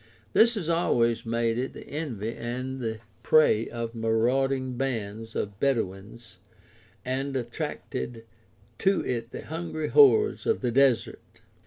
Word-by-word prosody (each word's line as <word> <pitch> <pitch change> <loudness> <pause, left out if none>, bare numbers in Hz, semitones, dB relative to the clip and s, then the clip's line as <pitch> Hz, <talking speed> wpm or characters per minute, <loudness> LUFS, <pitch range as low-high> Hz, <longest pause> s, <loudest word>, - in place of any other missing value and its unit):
This 235 +1 +5
has 190 -7 -3
always 120 -9 +1
made 115 0 0
it 130 - -3
the - - -10
envy 120 -8 -4
and 125 +3 -5
the 110 -2 -3 0.2
prey 115 -8 +4
of 115 -1 -5
marauding 125 +3 +1
bands 115 -4 -4
of 100 -1 -3
Bedouins 110 -3 -2 0.7
and 135 +2 -2
attracted 115 - -4 0.5
to 195 0 +2
it 115 -2 -2
the - - -8
hungry 160 -1 -4
hordes 425 0 +5
of 450 - +1
the - - 0
desert. 130 -2 +2
120 Hz, 130 wpm, -27 LUFS, 115-140 Hz, 0.7 s, This